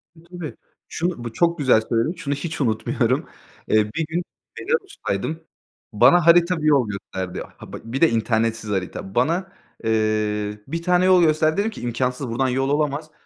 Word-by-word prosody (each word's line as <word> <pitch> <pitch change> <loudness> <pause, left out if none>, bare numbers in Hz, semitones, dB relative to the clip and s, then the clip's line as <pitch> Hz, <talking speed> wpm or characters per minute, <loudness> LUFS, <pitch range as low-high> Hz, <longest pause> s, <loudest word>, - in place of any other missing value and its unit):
E, 160 - -18
tabii. 170 -2 -8 0.3
Şunu, 170 -7 -2
bu 115 -1 -6
çok 170 +6 +2
güzel 130 -6 +4
söyledin. 115 +8 0
Şunu 145 -5 -3
hiç 145 +1 -4
unutmuyorum. 110 -4 0 0.4
Eee, 105 -1 +2
bir 165 - 0
gün 175 +2 -1 0.4
Belarus'taydım. 165 - -3 0.5
Bana 175 +10 +5
harita 175 +1 +5
bir 155 - 0
yol 140 -6 +4
gösterdi. 95 -2 -5 0.2
Ha, - - -12
bak, - - -7
bir 125 +4 -4
de 165 - +6
internetsiz 115 -1 0
harita. 95 0 -4
Bana, 170 +9 +1 0.3
eee, 110 -1 0
bir 165 +1 -3
tane 180 +1 +3
yol 185 -1 +6
gösterdi. 155 0 +2
Dedim 210 +3 +1
ki - - -10
imkânsız. 125 +2 -2
Buradan 130 +3 0
yol 135 +2 0
olamaz. 150 +1 -1
140 Hz, 170 wpm, -22 LUFS, 110-170 Hz, 0.5 s, de